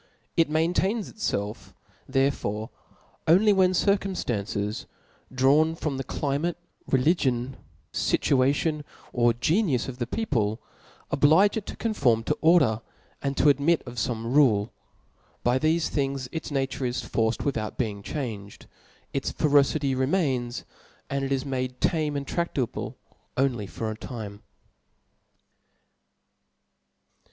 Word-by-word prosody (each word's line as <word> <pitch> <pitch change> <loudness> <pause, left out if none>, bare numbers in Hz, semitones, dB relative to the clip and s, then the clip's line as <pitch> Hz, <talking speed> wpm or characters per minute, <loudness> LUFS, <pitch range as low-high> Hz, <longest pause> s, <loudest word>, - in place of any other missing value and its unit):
It 165 -3 +3
maintains 180 +7 0
itfelf 105 - -3 0.4
therefore 130 -5 0 0.6
only 200 +6 +6
when 190 -2 +4
circumftances 120 - -1 0.4
drawn 145 +5 +3
from 150 -4 -3
the 135 - -3
climate^ 145 +6 -1 0.3
reli 135 +5 +4
gion, 130 -5 -1 0.4
(ituatibn, 145 +3 +1 0.3
or 120 -1 +3
genius 150 - +1
of 130 -1 -7
the 120 - -2
people, 115 - -1 0.5
oblige 155 +8 +5
it 220 -3 -4
to - - -6
conform 130 - +1
to - - -1
order, 145 -10 +4 0.4
and 140 0 -2
to 150 - +5
admit 145 +4 +3
of 120 -1 -9
fome 115 0 -2
rule. 115 -8 +4 0.7
By 125 +2 +2
thefe 160 +2 +2
things 135 -2 -1
its 160 - -5
nature 135 -1 -2
is 125 0 -1
forced 110 0 0
witl^out 115 -7 -2
being 105 -5 -2
changed; 105 -6 -6 0.5
its - - -1
ferocity 145 -1 +2
remains 130 -3 0 0.2
\ - - -31
and 140 0 -1
it 135 - -2
is 135 0 0
made 130 -2 -3
tamo 155 -3 +1
and 140 - -4
tradable 140 -7 -2 0.4
only 125 -6 +1
for 110 +2 -4
a - - -5
time. 110 -3 -7
135 Hz, 125 wpm, -26 LUFS, 120-155 Hz, 0.7 s, only